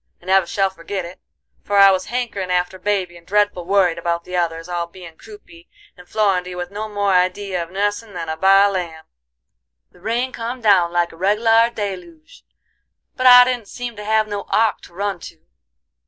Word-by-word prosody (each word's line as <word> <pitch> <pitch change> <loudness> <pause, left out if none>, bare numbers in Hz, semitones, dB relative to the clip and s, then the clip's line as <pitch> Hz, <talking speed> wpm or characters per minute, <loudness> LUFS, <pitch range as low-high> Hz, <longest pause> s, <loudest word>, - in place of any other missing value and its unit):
I - - -22
never 190 -1 +3
shall 195 +1 0
forgit 190 +1 -6
it, 175 +2 -11 0.4
for 205 - -1
I 195 0 +8
was 185 -1 -1
hankerin' 235 -7 -3
after 180 +1 -1
baby, 185 -3 -2
and 170 0 -19
dreadful 205 -3 +1
worried 185 -4 +2
about 170 0 -2
the 180 - -7
others, 165 -1 -2
all 175 -1 -3
bein' 170 -2 -13
croupy, 190 -4 -16 0.3
and 180 0 -16
Florindy 185 -4 0
with 175 +1 -6
no 215 +2 -5
more 205 -2 0
idee 185 +2 0
of 170 -2 -3
nussin' 205 +2 -3
than 165 -2 -5
a 160 - -3
baa 195 +4 +5
lamb. 170 -5 -4 0.9
The - - -22
rain 235 +5 -1
come 240 +1 -5
down 195 -7 +3
like 175 0 0
a 165 - -15
reg'lar 225 +5 +3
deluge, 180 -8 -8 0.7
but 255 0 +2
I 250 0 +10
didn't 245 -4 -3
seem 245 +2 -7
to 210 - -8
have 215 0 +1
no 205 -1 -5
ark 220 -1 +1
to - - -18
run 200 -1 -3
to. 165 -1 -13
195 Hz, 190 wpm, -20 LUFS, 175-210 Hz, 0.9 s, I